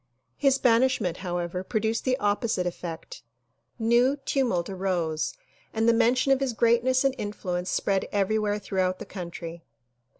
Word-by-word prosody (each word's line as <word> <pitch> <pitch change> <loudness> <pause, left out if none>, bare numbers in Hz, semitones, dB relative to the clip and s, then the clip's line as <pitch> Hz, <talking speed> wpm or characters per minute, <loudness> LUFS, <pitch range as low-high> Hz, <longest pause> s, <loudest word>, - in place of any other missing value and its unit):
His 275 -2 +3
banishment 235 -7 +2
however 175 0 -3
produced 220 +2 -1
the 255 -1 +2
opposite 205 -4 0
effect. 170 -5 -6 0.6
New 240 +4 +3
tumult 260 -10 0
arose 180 - -2 0.4
and 225 +1 +2
the 235 - +6
mention 245 +4 +3
of 270 - +4
his 270 -3 -1
greatness 240 +3 +3
and 270 -1 +2
influence 180 -3 -3
spread 195 -1 0
every 205 +2 +1
where 210 -1 0
throughout 185 -2 -1
the - - -8
country. 170 -2 -7
210 Hz, 140 wpm, -26 LUFS, 180-245 Hz, 0.6 s, the